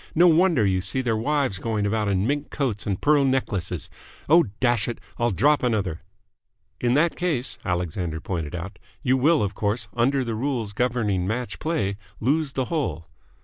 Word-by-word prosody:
No 170 +2 +6
wonder 165 - +4
you 95 -1 +1
see 105 +8 -1
their 120 -3 0
wives 135 -3 0
going 110 -2 -1
about 105 0 0
in 100 0 +1
mink 145 +3 -1
coats 115 -8 -2
and 95 -3 -1
pearl 145 -1 +4
necklaces. 100 - -1 0.4
Oh, 170 +3 +6
dash 120 -3 +2
it! 120 - -3 0.2
I'll 120 0 +2
drop 145 +8 +3
another!" 105 -9 -1 0.8
"In 120 +1 +2
that 165 +3 +3
case," 135 -9 -1
Alexander 90 -2 -2
pointed 85 -3 -4
out, 90 +4 -7 0.2
"you 130 -2 +3
will, 145 +1 +3
of 100 0 -2
course, 105 +3 -1
under 130 +3 +2
the 115 -2 -3
rules 115 -3 -2
governing 105 -7 0
match 120 +4 -3
play, 105 -12 -1 0.2
lose 140 +4 +1
the 130 -1 -1
hole." 85 - -3
120 Hz, 175 wpm, -24 LUFS, 100-140 Hz, 0.8 s, No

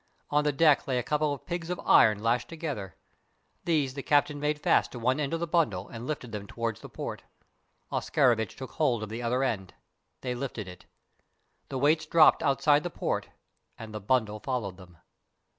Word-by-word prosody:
On 150 0 +3
the 150 - +2
deck 145 -1 +4
lay 130 -2 0
a 125 - 0
couple 150 +2 0
of 140 - -6
pigs 175 -1 -4
of 180 - -3
iron 105 -1 +5
lashed 115 +1 +1
together. 150 - -5 0.7
These 150 -6 +1
the 140 - -5
captain 145 +1 +2
made 150 +1 -1
fast - - +2
to - - -6
one 130 +4 +1
end 140 -2 -1
of 165 - -1
the 170 - -1
bundle 160 - 0
and 115 +1 -7
lifted 135 -6 -4
them 105 -2 -6
towards 115 -1 -3
the - - -10
port. - - -6 0.7
Oscarovitch 120 -7 +1
took 130 - -8
hold 120 -8 +1
of 105 - -6
the 115 +2 -5
other 125 +3 0
end. 100 -8 -2 0.5
They 125 -1 -2
lifted 120 -5 -5
it. 90 0 -11 0.8
The 135 - -3
weights 155 +4 +2
dropped 160 -1 +6
outside 145 +1 +3
the 175 - -4
port, - - -3 0.5
and 110 -1 -9
the 105 - -5
bundle 105 -1 +1
followed 105 -7 -3
them. 90 -3 -15
130 Hz, 190 wpm, -28 LUFS, 110-150 Hz, 0.8 s, dropped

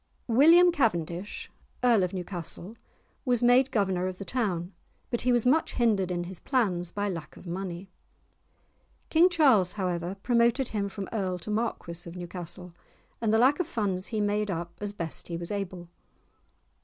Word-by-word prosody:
William 330 +9 +6
Cavendish, 185 - -1 0.3
Earl 235 -4 +5
of 180 -1 0
Newcastle, 180 +2 -6 0.5
was 245 -3 +1
made 250 +2 +5
governor 190 -6 0
of 185 -1 -5
the 195 - -7
town, 190 -8 -2 0.4
but 240 - 0
he 250 - +2
was 240 -1 +2
much 295 +6 +3
hindered 210 -6 +2
in 175 -1 -2
his 180 0 -7
plans 185 -10 0
by 205 0 -2
lack 170 -5 -6
of - - -13
money. 180 +1 -5 1.2
King 335 +3 +6
Charles, 265 - +4
however, 180 -1 -2
promoted 240 +2 +2
him 200 -2 -2
from 195 -1 -6
Earl 190 -4 -1
to 180 +5 -6
Marquis 175 -6 -3
of 170 - -11
Newcastle, 180 0 -7 0.5
and 225 -2 +1
the 220 - +4
lack 260 +7 +4
of 360 - 0
funds 200 - -1
he 220 - -2
made 210 0 0
up 170 -1 -4
as 205 -1 -2
best 170 -6 -5
he 170 - -4
was 170 +2 -6
able. 185 -4 -4
200 Hz, 170 wpm, -28 LUFS, 180-235 Hz, 1.2 s, William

